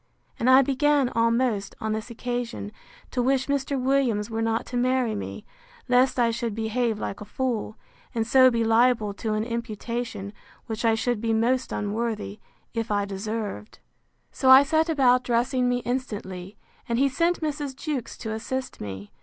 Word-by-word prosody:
—And 245 - +2
I 260 +1 +8
began 280 0 +2
almost, 230 -3 +1
on 220 -1 -2
this 220 +2 -4
occasion, 240 -2 -4 0.4
to 250 - 0
wish 260 +1 +2
Mr. 280 -1 -1
Williams 250 -5 +1
were 225 0 -2
not 225 0 0
to 250 - -7
marry 250 -2 +1
me, 205 - -6 0.4
lest 255 +1 +3
I 235 -2 +3
should 230 -2 -3
behave 225 0 0
like 205 - -5
a - - -6
fool; 230 -3 -3 0.4
and 225 -1 +1
so 255 +2 +6
be 230 -2 0
liable 225 -2 +3
to 215 +1 -2
an 215 - 0
imputation, 230 -2 -4 0.3
which 225 -1 -4
I 225 -1 +4
should 230 -1 -1
be 225 -1 0
most 245 +3 +1
unworthy, 215 0 -3 0.3
if 230 -1 -2
I 205 -1 +1
deserved. 210 +2 -5 0.5
So 260 - +1
I 260 +1 +10
set 315 +3 +1
about 255 -5 +4
dressing 245 +1 +1
me 245 0 0
instantly; 210 -6 -4 0.3
and 235 - +1
he 275 +2 +4
sent 335 +7 +1
Mrs. 295 -3 -3
Jewkes 285 -5 -4
to 220 -2 -3
assist 260 +4 -4
me. 100 0 -7
235 Hz, 170 wpm, -25 LUFS, 220-260 Hz, 0.5 s, I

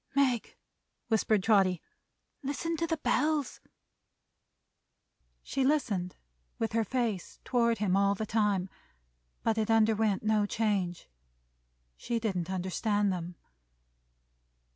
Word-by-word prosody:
"Meg!" 260 -5 +1 0.5
whispered 215 -2 +2
Trotty. 190 -5 +3 0.6
"Listen 290 +4 -2
to 335 - -1
the 325 0 -1
Bells!" 300 -2 0 1.8
She 270 - -1
listened, 225 -11 0 0.4
with 225 - -1
her 225 0 +2
face 225 -5 -2
toward 235 -2 +2
him 195 -2 +1
all 200 0 +3
the 220 - -3
time. 205 -4 +1 0.8
But 225 -1 +1
it 215 - -1
underwent 220 -2 +3
no 215 -1 +2
change. 200 -6 -1 0.9
She 235 - -2
didn't 185 -6 -2
understand 190 +2 0
them. 175 0 -5
215 Hz, 105 wpm, -30 LUFS, 195-235 Hz, 1.8 s, Trotty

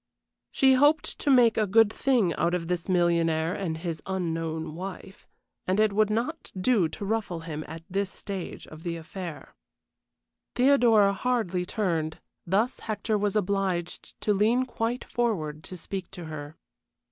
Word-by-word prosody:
She 265 -1 +5
hoped 290 +4 +3
to - - -1
make 245 -4 +5
a 215 -1 +2
good 220 +2 +5
thing 240 -10 +2
out 175 +1 +1
of 165 -2 -3
this 175 +1 -2
millionaire 170 -2 +2
and 165 -5 -3
his 165 -2 -4
unknown 165 -4 -2
wife, 190 +2 -8 0.4
and 185 +3 +1
it 215 -2 +3
would 215 0 +3
not 245 +10 -2
do 190 -5 +3
to 200 - -6
ruffle 205 -5 -2
him 155 -2 -5
at 160 +1 -8
this 195 +1 -1
stage 195 -2 -6
of 155 0 -12
the 170 0 -3
affair. 170 0 -8 1.0
Theodora 240 -6 +5
hardly 195 -6 -1
turned, 165 -7 -1 0.3
thus 215 +8 +1
Hector 215 0 -2
was 205 -1 0
obliged 195 -3 -2
to 210 - +2
lean 225 +6 +3
quite 240 0 -2
forward 160 -11 -2
to 185 - -7
speak 190 +1 -6
to 180 -3 -9
her. 155 -1 -7
190 Hz, 155 wpm, -27 LUFS, 170-220 Hz, 1.0 s, She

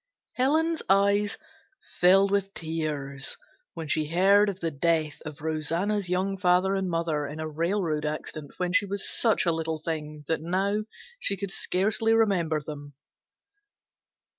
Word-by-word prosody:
Helen's 320 +5 +1
eyes 200 +1 +3 0.6
filled 195 +2 +5
with 200 -1 0
tears 150 -4 -3 0.4
when 160 -2 -5
she 155 0 0
heard 195 +5 +4
of 190 -2 -5
the 165 -3 -2
death 155 0 0
of 150 0 -9
Rosanna's 170 +6 -1
young 190 +2 0
father 185 +1 +3
and 190 -1 -1
mother 165 -3 -1
in 150 +2 -7
a 155 - -3
railroad 165 0 -1
accident 150 -1 -5
when 180 -1 -1
she 205 -2 +3
was 200 0 -1
such 225 -5 +3
a 170 - +3
little 160 -1 -2
thing 150 -1 -5
that 160 - 0
now 195 +5 0 0.3
she 200 - 0
could 200 0 -4
scarcely 215 +5 +1
remember 180 -8 +2
them. 145 -1 -9
175 Hz, 145 wpm, -27 LUFS, 155-200 Hz, 0.6 s, filled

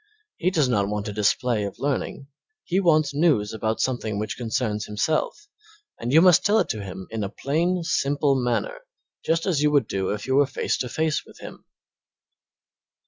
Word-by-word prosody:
He 185 - +1
does 155 -7 +2
not 105 -5 +1
want 105 0 -3
a - - -5
display 105 +2 +1
of 100 -1 -5
learning; 140 0 -3 0.4
he 185 +2 0
wants 155 -6 +3
news 140 -10 +2
about 110 0 -2
something 115 -5 -1
which 105 -1 -3
concerns 110 -2 -2
himself, 155 - -1 0.5
and 120 - -3
you 160 +4 +6
must 180 -2 +6
tell 210 +1 +3
it - - +1
to 110 - -3
him 95 -1 -7
in 110 -2 -3
a 100 - -3
plain, 170 - -1
simple 145 -3 +1
manner 130 - -1 0.4
just 165 0 0
as 165 -7 +1
you 150 - +4
would 140 -6 +2
do 95 -1 -2
if 105 0 -3
you 130 - -1
were 140 0 +4
face 140 - -1
to 125 - -3
face 155 +3 -1
with - - -17
him. - - -11
130 Hz, 190 wpm, -24 LUFS, 105-155 Hz, 0.5 s, you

